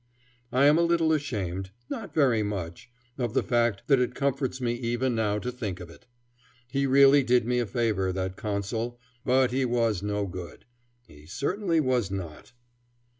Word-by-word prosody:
I 130 +3 +4
am 150 +3 +6
a - - +4
little 170 -2 +3
ashamed 95 - -3 0.2
not 200 0 -6
very 130 -8 +3
much 95 -3 -5 0.3
of 120 -1 -2
the - - +3
fact 120 -5 +1
that 135 -3 +4
it 125 - -1
comforts 135 -2 -1
me 120 -2 0
even 120 +1 -1
now 105 -2 0
to 125 +4 -3
think 105 -7 -5
of 85 -2 -9
it. - - -18 0.6
He 140 +2 0
really 140 +1 +6
did 125 -2 +2
me 125 +1 +1
a 120 - -1
favor, 100 -3 0
that 95 0 -3
Consul; 110 +4 -3 0.2
but 130 -1 +3
he 130 +1 +1
was 115 -6 +1
no 105 0 -1
good. 90 -4 -8 0.4
He 75 -5 -17
certainly 165 - 0
was 125 -8 +1
not. 95 -1 -7
120 Hz, 175 wpm, -27 LUFS, 100-135 Hz, 0.6 s, am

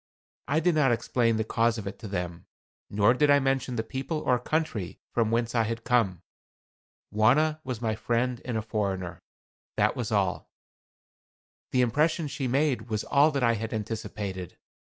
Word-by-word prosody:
I 145 +4 +2
did 175 +2 +2
not 150 -5 +3
explain 115 -1 +1
the 110 - +1
cause 115 +1 +1
of 110 - -6
it 100 - -6
to 110 - -7
them, 90 -3 -4 0.4
nor 105 +3 +4
did 145 +3 +2
I 145 - +7
mention 135 -2 0
the 110 - -1
people 135 +7 -4
or 125 -4 +2
country 125 - -2
from 115 -2 +2
whence 115 +1 0
I 115 - +3
had 115 +1 -4
come. 100 -8 +1 0.9
Wauna 145 +9 +3
was 125 -3 -5
my 110 -1 +1
friend 120 +2 -1
and 120 -3 -2
a 110 - -2
foreigner 100 -5 -3 0.6
that - - +2
was - - -3
all. - - 0 1.2
The 130 - +2
impression 150 +6 +1
she 140 -2 -3
made 130 -3 0
was 110 -1 -1
all 145 +2 +4
that 140 -4 -1
I 115 -1 +4
had 110 0 -3
anticipated. 105 -4 -5
115 Hz, 175 wpm, -27 LUFS, 110-135 Hz, 1.2 s, I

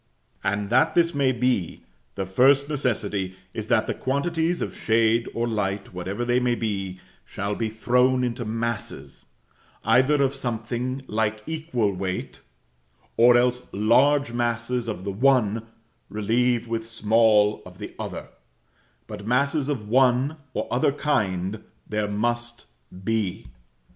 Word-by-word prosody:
And 105 +1 -1
that 120 - +3
this 170 -1 +3
may 140 -2 +2
be, 125 -7 -1 0.3
the 95 - -2
first 135 +9 +4
necessity 105 -9 -1 0.2
is - - -5
that - - +3
the - - -2
quantities 165 +5 -1
of - - -4
shade 115 +1 +2
or 120 +1 0
light, 100 -3 -2
whatever 95 +6 -3
they 120 +1 +2
may 125 -1 +1
be, 95 -5 -3 0.2
shall 100 +1 -4
be 110 +1 -2
thrown 125 +3 +2
into 120 0 -2
masses, 115 0 -4 0.6
either 140 +3 +4
of 135 0 +1
something 125 +1 -3
like 110 -2 -1
equal 155 -10 -1
weight, 95 0 -4 0.8
or 120 +1 +6
else 125 0 +1
large 125 +6 +3
masses 120 0 -1
of 105 -4 -4
the 100 - -3
one 115 -1 +2 0.4
relieved 115 +3 +1
with 115 0 -3
small 110 -1 +3
of - - -13
the - - -8
other; - - -6 0.8
but 105 -1 -8
masses 140 +4 +1
of 120 -8 -3
one 130 +5 +3 0.2
or - - -2
other 125 +3 +2
kind 105 -9 -1 0.2
there 105 -1 -1
must 120 +3 -2 0.4
be. 110 -3 -1
115 Hz, 135 wpm, -24 LUFS, 105-130 Hz, 0.8 s, or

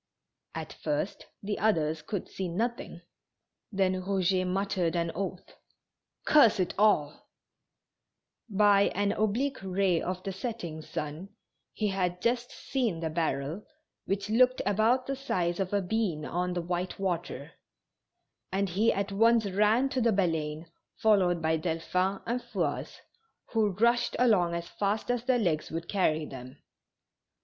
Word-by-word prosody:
At 160 -1 -5
first 150 +5 -3 0.2
the 205 +1 -2
others 160 -7 +1
could 200 +1 -4
see 190 - -4
nothing, 235 +9 -3 0.7
then 190 -2 +2
Eouget 185 0 0
muttered 185 -2 0
an 170 -1 0
oath: 190 0 -5 0.7
"Curse 230 -8 +6
it 180 - 0
all! 180 -8 +2 0.6
" - - -51
By 200 -1 +5
an 200 +1 +1
oblique 240 +6 0
ray 190 -2 +1
of 185 0 -4
the 195 - -3
setting 190 -6 -5
sun, 155 +5 -5 0.4
he 210 -1 -1
had 180 -2 -1
just 240 +4 0
seen 235 -11 -2
the 160 -1 -2
barrel, 155 +2 -2 0.4
which 195 +1 -2
looked 255 +4 +4
about 225 +5 +2
the 275 - -2
size 180 -10 -1
of 190 -1 -1
a 200 -1 +1
bean 180 -6 -1
on 180 +1 -1
the 175 -1 -2
white 180 +1 -3
water, 175 -6 -3 1.0
and 195 0 0
he 205 +6 +3
at 200 0 -2
once 225 +2 +4
ran 215 +7 +3
to 260 -1 -1
the 230 - +3
Bahine^ 165 -6 0 0.3
followed 185 -6 +3
by 160 0 +2
Delphin 180 +4 -1
and 240 +2 -1
Fouasse, - - -3 0.5
who 220 -2 +2
rushed 235 +5 +2
along 190 -9 +3
as 170 0 -4
fast 210 +3 -1
as 245 -1 -2
their 255 -1 +3
legs 170 -9 0
would 165 +1 -5
carry 160 -6 +1
them. 130 -2 -10
190 Hz, 145 wpm, -29 LUFS, 170-215 Hz, 1.0 s, Curse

